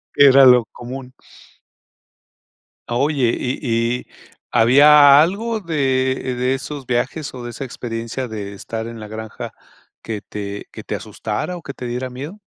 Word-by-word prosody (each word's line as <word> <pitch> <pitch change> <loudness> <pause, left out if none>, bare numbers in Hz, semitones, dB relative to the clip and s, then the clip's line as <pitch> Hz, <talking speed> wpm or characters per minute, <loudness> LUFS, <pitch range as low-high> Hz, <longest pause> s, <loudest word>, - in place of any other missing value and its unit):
Era 140 -1 +7
lo 125 -2 +7
común. 125 +2 -9 1.7
Oye 130 0 +1
y 125 +1 -2 0.4
y, - - -14 0.4
¿había 145 +4 +7
algo 220 +7 0
de, 135 -7 0 0.2
eh, - - -3
de 125 +1 0
esos 140 0 -7
viajes 135 +5 -1
o 125 -2 -8
de 120 - -6
esa 130 - -6
experiencia 115 0 -5
de 105 -3 -6
estar 110 +3 -6
en 115 -1 -8
la 105 - -8
granja 110 0 -7 0.5
que 110 -2 -5
te 100 0 -6
que - - -9
te - - -4
asustara 110 +12 -4
o - - -10
que 140 - -7
te 125 - -8
diera 125 +2 -3
miedo? 145 +11 -8
130 Hz, 155 wpm, -20 LUFS, 115-140 Hz, 1.7 s, Era